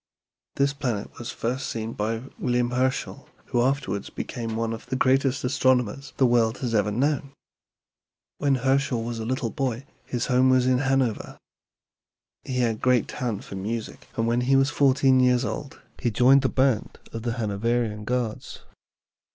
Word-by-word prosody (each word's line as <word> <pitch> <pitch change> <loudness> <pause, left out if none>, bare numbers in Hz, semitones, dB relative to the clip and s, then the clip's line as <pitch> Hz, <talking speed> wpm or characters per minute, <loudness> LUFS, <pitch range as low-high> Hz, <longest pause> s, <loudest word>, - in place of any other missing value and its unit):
This 140 0 +2
planet 120 -8 -4
was 120 - -6
first 125 +4 -3
seen 115 0 -4
by 110 +2 -2 0.2
William 120 0 0
Herschel, 130 +1 -1 0.2
who 120 - 0
afterwards 125 -7 -1
became 115 -2 -5
one 115 0 -1
of 115 - -8
the 130 - -2
greatest 130 +1 +2
astronomers 130 0 +1
the 135 - +4
world 115 -2 +3
has 120 -3 -2
ever 105 -2 +2
known. 140 +5 0 1.1
When 140 -2 +2
Herschel 135 -1 +1
was 115 0 -4
a 110 - -4
little 125 -2 -1
boy 130 -1 -2 0.2
his 120 -2 -2
home 130 0 +3
was 130 -1 +4
in 130 -1 +3
Hanover. 130 -4 0 1.1
He 130 - -4
had 115 -3 0
great 125 -2 +3
talent 120 -5 -3
for - - -10
music, 110 +4 -5
and 115 - +1
when 120 +1 +1
he 135 +2 +3
was 135 +1 +3
fourteen 135 -2 +4
years 125 -1 +3
old 145 0 -5 0.2
he 120 - +1
joined 125 +5 +5
the 130 - +1
band 130 -4 +1 0.2
of 115 - -4
the 120 0 -2
Hanoverian 110 0 -1
Guards. 120 -1 -3
125 Hz, 165 wpm, -25 LUFS, 115-130 Hz, 1.1 s, joined